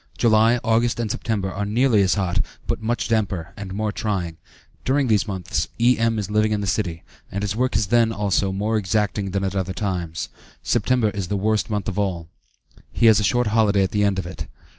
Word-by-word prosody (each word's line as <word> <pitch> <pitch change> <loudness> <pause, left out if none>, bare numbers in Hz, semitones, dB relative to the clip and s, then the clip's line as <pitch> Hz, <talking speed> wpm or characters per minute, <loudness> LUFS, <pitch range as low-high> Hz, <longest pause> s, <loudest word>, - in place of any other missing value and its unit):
July, 115 +1 +4
August, 115 +1 +1
and 110 -3 -1
September, 100 -5 -2
are 100 +3 -3
nearly 110 +1 +3
as 95 0 +3
hot, 95 -2 0 0.2
but - - -2
much 120 +2 -1
damper, 100 -7 -1
and 100 -2 -7
more 105 +2 -1
trying; 95 -6 -3 0.5
during 140 +2 +2
these 110 -2 +2
months, 95 -4 -2
E.M. 115 -1 +3
is 105 -1 -3
living 110 0 +2
in 105 - +1
the 100 - -2
city, 90 -4 -2 0.3
and 100 +2 -3
his 100 0 -1
work 125 +2 0
is - - +2
then, 115 +2 +3
also, 100 -2 0
more 105 +3 0
exacting 105 0 0
than 100 +1 -2
at 95 0 -2
other 95 -1 -1
times, 90 -6 -3 0.3
September 120 -1 +1
is 100 -3 -4
the 100 - -1
worst 110 +3 0
month 105 -3 -2
of 105 -1 -2
all; 90 -5 -2 0.6
he - - +1
has 110 -1 +7
a - - 0
short 120 +4 +2
holiday 105 -3 +3
at 95 - -1
the 105 0 +1
end 100 -2 +2
of 95 - -2
it. 90 - -7
105 Hz, 210 wpm, -22 LUFS, 95-110 Hz, 0.6 s, has